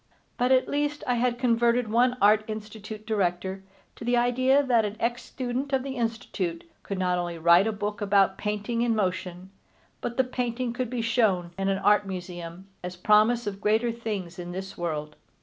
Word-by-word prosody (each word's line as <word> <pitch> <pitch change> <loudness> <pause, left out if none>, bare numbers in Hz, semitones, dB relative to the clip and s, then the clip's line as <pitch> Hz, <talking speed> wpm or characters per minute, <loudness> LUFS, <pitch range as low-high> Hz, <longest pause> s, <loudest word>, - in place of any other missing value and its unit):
But 250 +1 +1
at 260 -1 +4
least 290 +1 -1
I 250 - +1
had 245 0 +1
converted 240 -1 +2
one 245 +3 +2
Art 210 +1 +5
Institute 215 0 -7
Director 190 -2 -1 0.3
to - - -10
the 245 +1 +2
idea 255 +3 +3
that 240 -4 +3
an 210 +1 -4
ex 240 +1 -1
student 255 +3 -4
of 265 -1 +2
the 270 -1 -5
Institute 225 -8 -3
could 200 - -5
not 180 -1 +1
only 175 -1 -3
write 170 +5 +5
a - - +1
book 205 0 -4
about 195 -1 +3
painting 210 +3 -2
in 235 -1 +2
motion, 185 -2 -2 0.5
but 240 0 -4
the 260 - +5
painting 250 -1 -2
could 250 -1 -3
be 245 -2 -2
shown 215 -7 +1
in 195 +1 -1
an 195 - +1
Art 205 +1 +3
Museum 180 -1 -7 0.2
as 180 0 -5
promise 215 +6 +3
of 200 -1 -5
greater 220 +3 +2
things 205 -7 -5
in 175 0 -6
this 190 +1 -6
world. 150 -3 -4
215 Hz, 185 wpm, -27 LUFS, 190-240 Hz, 0.5 s, Art